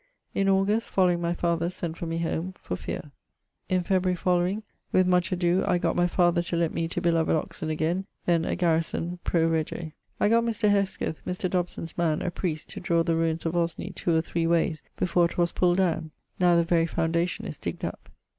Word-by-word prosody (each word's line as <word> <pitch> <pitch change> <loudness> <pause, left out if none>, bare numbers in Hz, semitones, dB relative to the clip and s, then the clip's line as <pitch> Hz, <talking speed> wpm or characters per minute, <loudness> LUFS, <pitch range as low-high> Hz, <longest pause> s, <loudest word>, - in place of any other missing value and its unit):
In 195 0 +2
August 195 +4 +2
following 180 -2 +2
my 170 0 0
father 170 0 0
sent 170 -2 -5
for 170 - -5
me 165 0 -2
home, 170 +2 -2
for 90 - -4
feare. 145 - -6 0.6
In 185 -1 +2
February... 185 0 +1
following, 180 +4 +1 0.3
with 185 - +4
much 180 -1 +2
adoe 180 0 +2
I 180 -3 +3
gott - - 0
my 175 0 +3
father 175 -1 +3
to 175 0 -3
lett 170 -1 +1
me 165 - -1
to - - -3
beloved 165 -1 +2
Oxon 155 0 -3
againe, 165 +5 -1 0.2
then 170 -2 +3
a - - -1
garrison 170 0 0
pro 165 -2 +2
rege. 160 0 -2 0.3
I - - +3
gott 230 +2 +4
Mr. 225 -2 +1
Hesketh, 195 -5 -1
Mr. 180 +1 -2
Dobson's 175 -2 -2
man, 160 -3 +1
a 180 - -1
priest, 165 -4 -3
to 205 - -6
drawe 170 -3 +2
the 165 -1 +1
ruines 165 0 0
of 165 +1 -1
Osney 170 -1 -1
2 170 - 0
or - - +3
3 165 0 -1
wayes 165 -1 +1 0.2
before 175 -1 +3
'twas 170 0 0
pulld 175 0 +2
downe[X]. 165 -4 +1 0.3
Now 175 -1 +5
the 170 - +4
very 165 0 +2
foundation 170 +1 -1
is - - -5
digged - - -4
up. - - -7
175 Hz, 205 wpm, -27 LUFS, 165-180 Hz, 0.6 s, Now